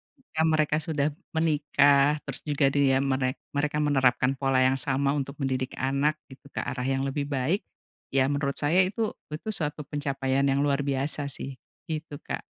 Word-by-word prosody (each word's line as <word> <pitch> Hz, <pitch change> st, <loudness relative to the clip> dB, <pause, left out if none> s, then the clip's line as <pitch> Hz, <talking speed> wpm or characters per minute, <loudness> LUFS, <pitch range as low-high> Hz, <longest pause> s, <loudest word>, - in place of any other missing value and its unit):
ketika 210 Hz, -12 st, -5 dB
mereka 155 Hz, -2 st, +2 dB
sudah 150 Hz, -3 st, 0 dB, 0.3 s
menikah 145 Hz, -2 st, +4 dB
terus -, -, -4 dB
juga 145 Hz, -1 st, +3 dB
dia 135 Hz, -2 st, +3 dB
merek 130 Hz, -1 st, 0 dB, 0.2 s
mereka 150 Hz, +1 st, 0 dB
menerapkan 135 Hz, -2 st, +3 dB
pola 135 Hz, -2 st, +3 dB
yang 130 Hz, +1 st, +3 dB
sama 140 Hz, +1 st, +1 dB
untuk 140 Hz, 0 st, -3 dB
mendidik 130 Hz, -1 st, -1 dB
anak 140 Hz, +3 st, +1 dB, 0.2 s
gitu 135 Hz, +1 st, -14 dB
ke -, -, -3 dB
arah 125 Hz, -1 st, -3 dB
yang 135 Hz, 0 st, 0 dB
lebih 140 Hz, +1 st, -2 dB
baik, 140 Hz, +8 st, 0 dB, 0.5 s
ya, 135 Hz, -1 st, +4 dB
menurut 140 Hz, -1 st, -1 dB
saya 160 Hz, +6 st, +4 dB
itu 215 Hz, +3 st, -1 dB, 0.2 s
itu 155 Hz, +8 st, -5 dB
suatu 150 Hz, -3 st, 0 dB
pencapaian 140 Hz, -2 st, -1 dB
yang 135 Hz, 0 st, +2 dB
luar 140 Hz, 0 st, +1 dB
biasa, 140 Hz, +1 st, 0 dB
sih, 135 Hz, +1 st, -6 dB, 0.3 s
gitu, 155 Hz, -2 st, -5 dB
Kak. -, -, -4 dB
140 Hz, 165 wpm, -27 LUFS, 135-150 Hz, 0.5 s, menikah